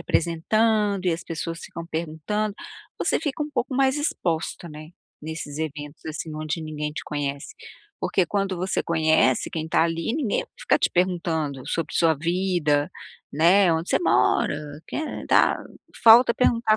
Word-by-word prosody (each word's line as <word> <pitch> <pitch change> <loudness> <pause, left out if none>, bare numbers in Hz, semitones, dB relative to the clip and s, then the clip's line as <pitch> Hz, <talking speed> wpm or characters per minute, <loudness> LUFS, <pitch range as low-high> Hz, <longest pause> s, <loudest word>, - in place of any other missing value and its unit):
apresentando, 200 +4 +1
e 175 - +3
as 165 - -5
pessoas 165 0 -5
ficam 170 0 -8
perguntando. 170 +6 -3 0.4
Você - - +1
fica 300 -1 -3
um 300 - -5
pouco 255 -2 -2
mais 265 +1 +3
exposta, 170 - -2
né, 155 0 -10 0.3
nesses 155 -2 -6
eventos, 150 -1 -6
assim, 155 0 -5
onde 155 +2 -3
ninguém 150 -1 -4
te - - -5
conhece. 140 -1 -4 0.4
Porque 185 - +1
quando 195 0 -1
você 185 +2 -1
conhece 160 -6 +2
quem 160 -1 -3
tá 160 - +2
ali, 165 +6 -1
ninguém 280 -9 0
vai - - -29
ficar - - +2
te - - +1
perguntando 165 -7 -1
sobre 165 - -3
sua 165 -1 +4
vida, 165 -2 0 0.4
né, 175 +4 +5
onde 165 +2 -2
você - - +3
mora, 145 -3 +2 0.3
quem - - -4 0.2
é, - - -9
tal. - - +4 0.5
Falta 235 +1 +8
perguntar 230 -3 +3
165 Hz, 160 wpm, -24 LUFS, 155-200 Hz, 0.5 s, Falta